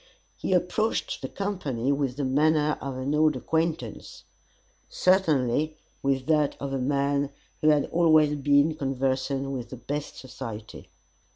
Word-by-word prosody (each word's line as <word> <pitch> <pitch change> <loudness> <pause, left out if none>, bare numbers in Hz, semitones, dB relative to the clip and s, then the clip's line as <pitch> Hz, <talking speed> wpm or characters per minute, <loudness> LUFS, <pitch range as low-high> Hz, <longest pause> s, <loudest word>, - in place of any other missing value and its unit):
He - - -2
approached 180 +5 0
the - - -4
company 145 - -2
with 140 -3 -1
the 145 - -1
manner 150 +3 +2
of 135 -2 -4
an 130 +3 -2
old 155 -1 +3
acquaintance; 155 -2 -3 0.7
certainly, 155 -5 +2 0.2
with 135 -1 0
that 150 -2 +2
of 140 -1 -4
a 135 - -1
man 140 +1 0 0.3
who 155 - +4
had 150 -2 +4
always 155 -3 +4
been 145 +2 +3
conversant 135 -1 -1
with 125 -3 -5
the 130 - -8
best 145 +4 -5
society. 115 -4 -8
140 Hz, 135 wpm, -26 LUFS, 135-155 Hz, 0.7 s, who